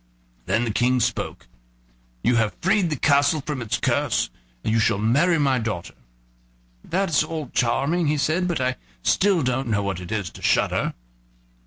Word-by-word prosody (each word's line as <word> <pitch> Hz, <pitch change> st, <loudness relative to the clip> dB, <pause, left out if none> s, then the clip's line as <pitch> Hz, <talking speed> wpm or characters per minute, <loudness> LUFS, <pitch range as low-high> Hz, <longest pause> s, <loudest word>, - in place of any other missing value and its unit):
Then 115 Hz, -, +1 dB
the 115 Hz, -, -1 dB
King 125 Hz, +4 st, +2 dB
spoke: 115 Hz, -1 st, -2 dB, 0.8 s
"You 125 Hz, -, +3 dB
have 110 Hz, -2 st, 0 dB
freed 190 Hz, -1 st, +2 dB
the 155 Hz, -, -1 dB
castle 145 Hz, +2 st, +3 dB
from 150 Hz, -4 st, -3 dB
its 115 Hz, 0 st, -1 dB
curse, 130 Hz, 0 st, 0 dB, 0.3 s
and 110 Hz, -, 0 dB
you 115 Hz, -, +3 dB
shall 105 Hz, -, +2 dB
marry 140 Hz, -, +3 dB
my 135 Hz, -4 st, +2 dB
daughter." 105 Hz, -6 st, -4 dB, 0.9 s
"That's 175 Hz, -5 st, +1 dB
all 155 Hz, -4 st, -5 dB
charming," 150 Hz, +8 st, +1 dB
he 150 Hz, +1 st, +1 dB
said; 160 Hz, +5 st, +1 dB
"but 170 Hz, -5 st, -1 dB
I 130 Hz, 0 st, 0 dB, 0.3 s
still 190 Hz, -, +3 dB
don't 130 Hz, +1 st, -1 dB
know 105 Hz, -2 st, +1 dB
what 95 Hz, -3 st, -2 dB
it 90 Hz, -1 st, -9 dB
is 105 Hz, -6 st, -2 dB
to -, -, -13 dB
shudder." -, -, +1 dB
130 Hz, 170 wpm, -23 LUFS, 115-155 Hz, 0.9 s, You